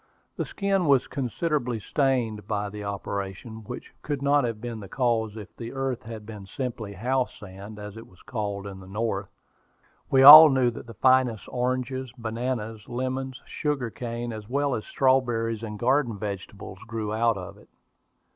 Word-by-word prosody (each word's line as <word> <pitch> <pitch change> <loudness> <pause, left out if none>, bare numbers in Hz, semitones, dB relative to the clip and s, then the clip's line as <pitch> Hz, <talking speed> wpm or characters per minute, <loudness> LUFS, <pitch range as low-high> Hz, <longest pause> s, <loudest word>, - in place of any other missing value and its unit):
The - - -2
skin 195 -4 0
was 135 -3 +4
considerably 125 -2 -2
stained 120 -4 0
by 105 -1 -2
the 105 0 -7
operation, 100 +2 -5
which - - -8
could 145 -2 -3
not 140 0 +4
have 115 -2 -3
been 115 -1 -5
the 100 -3 -10
case 115 -3 0
if 105 -3 -10
the 115 +1 -7
earth 135 -2 -2
had 110 -1 -8
been 105 -3 -9
simply 115 -4 -5
house 125 +6 -1
sand, 100 +2 -10
as 105 0 -8
it 115 - -10
is 90 - -21
called 100 -3 -3
in 95 -1 -7
the 95 - -12
North. 100 -1 -2 0.8
We 135 0 +5
all 155 +3 +13
knew 130 -3 +3
that 115 - -10
the 115 - -10
finest 130 -2 +3
oranges, 130 0 -2
bananas, 115 -1 -4
lemons, 130 +1 -3
sugar 140 -6 -2
cane, 120 0 -5
as 110 0 -8
well 140 +1 +1
as 110 - -3
strawberries 120 -4 +1
and 105 -2 -6
garden 125 -1 +1
vegetables, 100 -1 -6
grew 110 -2 -3
out 115 -1 +2
of 95 +2 -8
it. - - -20
115 Hz, 170 wpm, -26 LUFS, 105-130 Hz, 0.8 s, all